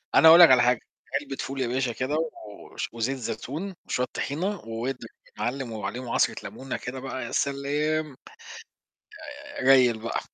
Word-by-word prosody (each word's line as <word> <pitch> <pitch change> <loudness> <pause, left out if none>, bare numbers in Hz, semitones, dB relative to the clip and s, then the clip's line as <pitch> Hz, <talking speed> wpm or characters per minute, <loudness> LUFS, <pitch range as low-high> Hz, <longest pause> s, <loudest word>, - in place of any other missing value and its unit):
أنا 160 - +8
أقول 165 +2 +10
لك 170 -6 +10
على 125 -1 +7
حاجة، 125 -1 +3 0.4
علبة 140 -1 -6
فول 135 0 -4
يا 125 - 0
باشا 125 0 0
كده، 130 +6 -2 0.6
وش - - -4
وزيت 120 +4 -2
زيتون 130 - -5
وشوية 125 - 0
طحينة 180 +7 -2
واضرب 115 +4 -4 0.3
يا - - -23
معلم، 125 -1 -3
وعليهم 110 +4 -5
عصرة - - +2
لمونة 135 0 -6
كده 130 +1 -6
بقى، 130 -2 -5
يا - - -7
سلام. 145 +1 -1 1.2
آآ، 285 - -8
ريل 125 -4 +5
بقى. 115 - -2
130 Hz, 165 wpm, -26 LUFS, 120-145 Hz, 1.2 s, أقول